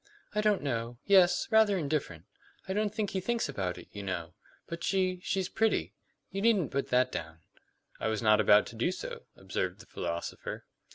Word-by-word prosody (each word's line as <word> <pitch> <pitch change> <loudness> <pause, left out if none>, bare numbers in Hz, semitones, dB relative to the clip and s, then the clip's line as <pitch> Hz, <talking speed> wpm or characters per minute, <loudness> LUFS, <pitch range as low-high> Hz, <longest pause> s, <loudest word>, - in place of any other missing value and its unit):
"I 210 - +1
don't 210 -5 +2
know. 120 -3 -2
Yes, 180 -3 +5
rather 220 -3 +5
indifferent. 140 - -2 0.4
I 190 - -1
don't 210 0 0
think 215 -2 -2
he 190 - -1
thinks 235 +5 0
about 90 -2 -3
it, 90 - -11
you 100 - -7
know. 90 -3 -4 0.3
But 170 0 -6
she 185 -1 +1
she's 190 0 -1
pretty. 220 +2 +1 0.4
You 195 +1 -3
needn't 205 - +3
put 140 0 -1
that 125 +1 +3
down." 80 0 -6 0.6
"I - - -1
was 110 0 -1
not 110 0 +5
about 105 0 +6
to - - -11
do 120 +10 +1
so," 185 - -7
observed - - -3
the - - -12
philosopher. 85 0 -5
155 Hz, 185 wpm, -30 LUFS, -, 0.6 s, about